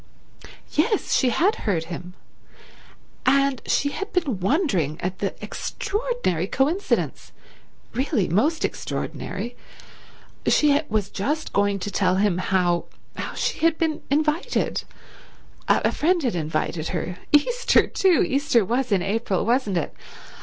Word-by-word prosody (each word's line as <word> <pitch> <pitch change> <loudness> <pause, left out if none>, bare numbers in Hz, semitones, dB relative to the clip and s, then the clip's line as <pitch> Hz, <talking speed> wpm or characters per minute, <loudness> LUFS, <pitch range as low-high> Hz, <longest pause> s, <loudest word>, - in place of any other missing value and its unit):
Yes, 400 +8 +1
she 260 - +3
had 390 - +2
heard 180 -7 -1
him, 180 +2 -8 1.1
and 275 0 +3
she 285 - +2
had 395 +8 -5
been 290 - 0
wondering 190 - +1
at 185 +1 -3
the 200 - -2
extraordinary 415 - -2
coincidence—really 270 - -2
most 290 - +2
extraordinary—she 285 +4 -2
was 210 -2 -1
just 295 +10 -2
going 200 0 +2
to 200 +2 -4
tell 185 -1 +2
him 195 -2 +2
how—how 180 -2 -2
she - - -1
had 325 0 +3
been 320 -2 -1
invited—a 300 +4 -2
friend 340 +2 +1
had 245 - +1
invited 160 0 -2
her—Easter, 295 - +2
too—Easter 285 - +2
was 245 +3 -1
in 190 -3 +3
April, 200 -1 0
wasn't 230 -5 +1
it? 165 - -2
240 Hz, 110 wpm, -24 LUFS, 185-305 Hz, 1.1 s, she